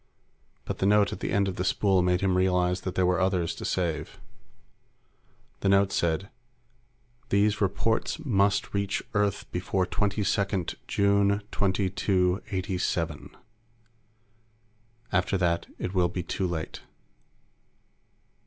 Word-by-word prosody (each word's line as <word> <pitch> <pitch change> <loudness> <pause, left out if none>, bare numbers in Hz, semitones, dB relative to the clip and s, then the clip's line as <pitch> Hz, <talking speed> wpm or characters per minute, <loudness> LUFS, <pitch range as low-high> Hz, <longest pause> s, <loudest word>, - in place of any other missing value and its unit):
But - - -4
the 95 - +2
note 105 0 +4
at - - -7
the - - -3
end 100 0 +2
of 95 - -4
the 90 - -1
spool 95 0 +2
made 90 0 +1
him 95 -1 +2
realize 90 -1 +2
that 95 - -4
there 95 - +2
were 90 0 +2
others 90 -3 +1
to - - -8
save. 80 -4 -2 1.4
The 100 - +1
note 100 0 +4
said: 85 +3 0 1.0
_These 105 +1 +2
reports 100 - 0
must 100 -10 +1
reach 100 0 -1
Earth 105 -2 0
before 90 +1 0
22 100 +2 -1 0.6
June 100 0 +2
2287. 95 -3 -1 1.7
After 90 +2 +1
that, 85 -2 0
it 90 - -4
will 90 -2 +2
be 90 0 -4
too 95 +2 -2
late. 80 -3 -5
95 Hz, 120 wpm, -27 LUFS, 90-100 Hz, 1.7 s, note